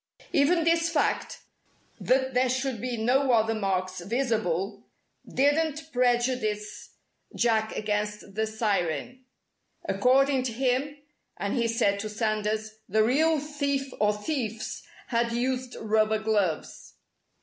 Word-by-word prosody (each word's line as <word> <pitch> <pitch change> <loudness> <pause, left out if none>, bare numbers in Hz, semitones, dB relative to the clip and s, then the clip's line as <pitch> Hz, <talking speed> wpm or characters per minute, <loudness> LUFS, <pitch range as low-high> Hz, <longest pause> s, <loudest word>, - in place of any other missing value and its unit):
Even 330 +4 +3
this 330 0 +2
fact 320 -3 -1 0.6
that 260 0 +1
there 250 +1 +3
should 260 -2 -1
be 250 -1 -3
no 255 +4 +2
other 225 -1 +3
marks 185 -3 -1
visible 215 -4 -1 0.4
didn't 310 +3 +1
prejudice 240 -4 0 0.4
Jack 220 -2 +1
against 210 -1 -3
the 220 +2 0
Siren. 215 - -2 0.6
According 270 +1 +3
to 250 -2 -3
him 265 +4 0 0.4
and 200 +2 -2
(he 235 -2 +1
said) 205 -3 +1
to 215 +1 -4
Sanders 215 0 -2
the 215 +3 +3
real 310 +7 +3
thief 280 -2 -2
or 210 0 +4
thieves 225 0 -3 0.3
had 235 -1 +1
used 255 +1 -2
rubber 215 0 +2
gloves. 210 -7 -2
235 Hz, 115 wpm, -27 LUFS, 215-265 Hz, 0.6 s, or